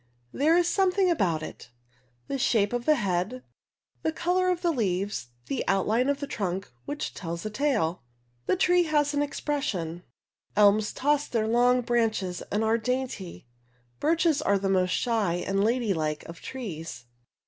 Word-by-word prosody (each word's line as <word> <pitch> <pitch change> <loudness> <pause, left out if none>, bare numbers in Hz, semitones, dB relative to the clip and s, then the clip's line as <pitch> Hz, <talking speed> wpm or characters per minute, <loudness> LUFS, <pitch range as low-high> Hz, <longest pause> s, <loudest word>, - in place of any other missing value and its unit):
There 315 +5 +3
is 350 -1 +3
some 380 0 +3
thing 370 -1 +2
about 170 - +1
it, - - -9 0.6
the 275 - -2
shape 220 -4 +2
of 245 0 -2
the 305 - +6
head, 205 +2 -1 0.6
the 320 - 0
color 360 +3 +1
of 360 0 -1
the 345 - +3
leaves, 200 - -1 0.2
the 135 +2 -2
outline 215 +7 +2
of 285 0 0
the 285 - -3
trunk 195 - -3
which 290 +1 -4
tells 170 0 -5
a 215 - -3
tale. 215 - 0 0.5
The - - +3
tree 355 -1 +3
has 295 -2 +1
an 290 - +1
expression. 275 - -2 0.5
Elms 210 +1 +4
toss 295 +1 +1
their 220 -2 0
long 245 +2 +4
branches 225 -7 0
and 210 +2 +1
are 225 +1 +2
dainty; 240 - -3 0.5
birches 325 -1 +2
are 200 - +2
the 195 0 -1
"most 185 -1 +2
shy 215 -4 +1
and 195 +3 0
ladylike 195 -10 0
of 165 0 -10
trees." 165 - -6
230 Hz, 160 wpm, -27 LUFS, 190-290 Hz, 0.6 s, the